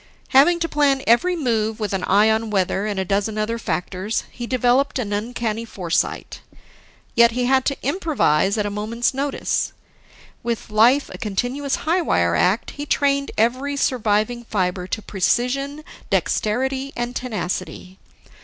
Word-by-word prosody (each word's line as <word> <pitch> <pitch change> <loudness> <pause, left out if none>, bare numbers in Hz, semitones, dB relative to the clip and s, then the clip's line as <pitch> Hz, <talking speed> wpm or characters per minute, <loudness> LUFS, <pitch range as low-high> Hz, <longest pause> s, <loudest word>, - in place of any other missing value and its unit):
Having 300 +6 +5
to 335 - +1
plan 280 -3 +2
every 335 +11 +3
move 225 -7 -1
with 210 -2 -2
an 190 - -1
eye 205 +3 +4
on 220 0 +1
weather 195 0 0
and 205 -2 -2
a 190 - -1
dozen 205 +3 -1
other 225 +2 -1
factors, 185 +3 -2
he 240 -1 -6
developed 255 +3 +2
in 210 -5 -2
uncanny 225 +1 -2
foresight. 180 -7 -2 0.7
Yet 235 -1 +5
he 250 +1 0
had 260 +1 +3
to 275 - 0
improvise 270 - +1
at 210 - 0
a 205 - -2
moment's 220 +5 -1
notice. 275 +1 -1 0.7
With 230 -2 -4
life 240 +7 +4
a - - -9
continuous 245 +7 -2
high 340 +3 +2
wire 85 - +1
act, 190 - +1
he 290 +1 -7
trained 280 -1 +1
every 255 +6 +1
surviving 240 -3 0
fiber 180 -4 -1
to 215 +3 -4
precision, 275 +9 -1 0.3
dexterity, 265 +5 0
and 240 +1 -3
tenacity. 190 -5 -4
230 Hz, 150 wpm, -21 LUFS, 205-270 Hz, 0.7 s, Having